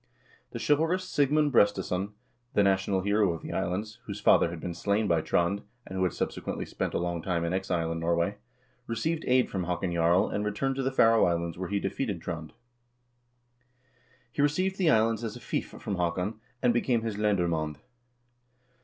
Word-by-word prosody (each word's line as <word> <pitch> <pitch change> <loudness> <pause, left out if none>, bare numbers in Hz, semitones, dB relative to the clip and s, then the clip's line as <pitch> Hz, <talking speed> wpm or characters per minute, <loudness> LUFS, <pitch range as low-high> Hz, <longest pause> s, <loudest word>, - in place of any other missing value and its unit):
The - - -6
chivalrous 160 +5 +2
Sigmund 145 -1 +2
Brestesson, 100 -2 +2 0.4
the 105 - +5
national 95 0 +2
hero 100 -2 +2
of 80 - -8
the - - -5
islands, 105 +5 -2
whose 100 -1 -5
father 105 - +5
had 85 -1 -6
been 85 +2 -4
slain 100 +5 0
by 85 -3 +2
Trond, 90 +5 +1 0.2
and 95 - -8
who 95 - +1
had 90 - +2
subsequently - - -3
spent - - -3
a - - +2
long 85 -1 -2
time 85 -1 -1
in 85 - -1
exile 90 -3 -1
in 85 - -3
Norway, 85 +4 0 0.5
received 155 +9 -1
aid 125 0 +4
from 95 -3 -3
Haakon 90 0 -2
Jarl, 85 +2 +3
and 105 - -2
returned 120 +6 -1
to - - 0
the 135 0 0
Faroe 115 -3 +5
Islands, 85 -1 -1
where 90 0 -5
he 100 0 0
defeated 100 0 -2
Trond. 80 -1 -6 1.8
He 140 - -1
received 185 +7 +1
the 175 -4 +4
islands 115 -3 +3
as 110 -2 -4
a - - -8
fief - - -3
from 100 - -5
Haakon, 90 +5 -1 0.2
and 125 -1 +4
became 120 -1 +1
his 110 -3 -3
lendermand. 85 -8 0
100 Hz, 180 wpm, -28 LUFS, 85-115 Hz, 1.8 s, the